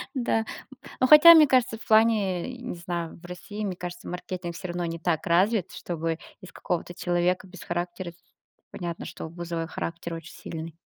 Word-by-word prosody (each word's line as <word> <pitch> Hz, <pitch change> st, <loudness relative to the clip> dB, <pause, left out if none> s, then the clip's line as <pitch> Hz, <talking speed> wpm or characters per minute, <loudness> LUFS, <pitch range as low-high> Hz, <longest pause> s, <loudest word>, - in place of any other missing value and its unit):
Да. 235 Hz, -3 st, +1 dB, 0.6 s
Но 255 Hz, -, +4 dB
хотя, 320 Hz, +3 st, +11 dB
мне 305 Hz, -3 st, +7 dB
кажется, 255 Hz, -3 st, +3 dB
в 220 Hz, -, -12 dB
плане, 215 Hz, -5 st, +3 dB
э, -, -, -5 dB
не 180 Hz, -, -5 dB
знаю, 170 Hz, -1 st, -4 dB
в 175 Hz, -, -11 dB
России, 205 Hz, +4 st, -7 dB
мне 190 Hz, -3 st, -2 dB
кажется, 175 Hz, 0 st, -7 dB
маркетинг 180 Hz, -1 st, -5 dB
всё 180 Hz, -, -6 dB
равно 175 Hz, 0 st, -3 dB
не 165 Hz, 0 st, -4 dB
так 165 Hz, -2 st, -1 dB
развит, 190 Hz, +3 st, +2 dB
чтобы 165 Hz, -1 st, -3 dB, 0.2 s
из 185 Hz, -2 st, -12 dB
какого-то 175 Hz, 0 st, -3 dB
человека 180 Hz, +1 st, 0 dB
без 185 Hz, -1 st, -12 dB
характера, 175 Hz, +1 st, -3 dB
с -, -, -25 dB, 0.5 s
понятно, 170 Hz, -3 st, -5 dB
что -, -, -7 dB
у -, -, -8 dB
Бузовой 170 Hz, -1 st, -4 dB
характер 170 Hz, 0 st, -5 dB
очень 165 Hz, 0 st, -9 dB
сильный. 160 Hz, 0 st, -7 dB
175 Hz, 190 wpm, -26 LUFS, 170-205 Hz, 0.6 s, хотя